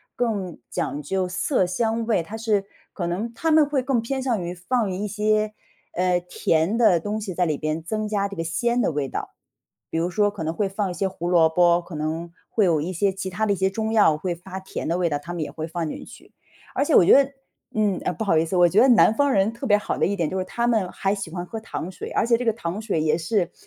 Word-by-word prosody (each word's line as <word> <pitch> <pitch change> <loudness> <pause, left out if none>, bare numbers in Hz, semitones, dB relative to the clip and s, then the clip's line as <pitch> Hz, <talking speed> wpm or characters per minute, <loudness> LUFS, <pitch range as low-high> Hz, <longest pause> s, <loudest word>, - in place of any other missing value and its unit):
更 205 -8 -2
讲 145 -1 -3
究 185 +4 -1
色 185 +2 0
香 225 +4 0
味， 210 -7 +2
它 205 +7 -8
是 215 -3 0 0.3
可 175 - -3
能 190 +7 -2
它 325 +5 0
们 310 0 +6
会 275 -3 0
更 255 -3 +1
偏 265 +3 -3
向 240 -7 0
于 175 +1 -4
放 215 +3 -1
一 195 +3 -3
些， 215 +1 0 0.4
呃， 180 0 +2
甜 165 +2 +1
的 220 -8 +4
东 210 +5 -3
西 190 -5 -5
在 180 - +2
里 155 -4 -1
边， 155 +1 -2
增 215 +5 -2
加 205 -1 0
这 200 - -8
个 165 - -3
鲜 235 +9 0
的 - - +1
味 145 -2 -2
道。 - - -6 0.6
比 165 - 0
如 170 - 0
说 205 +2 +2
可 200 -5 -6
能 160 +1 -2
会 200 +3 0
放 195 0 -2
一 - - -4
些 195 - 0
胡 180 -2 -5
萝 170 -2 +5
卜， 170 +1 +4
可 175 0 -12
能 160 +3 -3 0.2
会 215 - +2
有 165 -4 +2
一 175 +5 -3
些 195 +3 +1
其 190 0 -5
他 215 +4 -1
的 205 - +2
一 - - -1
些 190 +1 +1
中 220 +2 -2
药 205 -9 +5
会 175 +3 -2
发 190 +2 -8
甜 190 - -6
的 170 +2 0
味 180 -1 +1
道， 145 -2 -1
他 170 - -8
们 165 - -2
也 - - -6
会 160 0 -5
放 165 0 -3
进 - - -6
去。 - - -15 0.4
而 280 - +2
且 310 - 0
我 - - +8
觉 - - +5
得 275 0 +6 0.4
嗯， 210 -4 +1
呃， 180 - 0
不 220 - -4
好 190 -6 +2
意 160 - +3
思， 175 +3 -3
我 175 -1 +5
觉 195 - +3
得 255 - +6
南 235 - +6
方 285 +3 +2
人 195 -1 +2
特 235 +4 -7
别 210 -5 +5
好 - - -3
的 - - +2
一 200 - 0
点， 170 -5 -1
就 190 - -3
是 185 - -1
他 235 +5 -1
们 220 -6 +2
还 195 +1 -1
喜 195 -5 -6
欢 175 +1 -4
喝 220 +5 -6
糖 185 -4 -5
水， - - -8
而 - - +1
且 235 0 +3
这 250 - -4
个 225 - +3
糖 190 -3 -4
水 215 -7 -1
也 155 0 +2
是 175 +1 0
190 Hz, 290 characters per minute, -24 LUFS, 170-220 Hz, 0.6 s, 我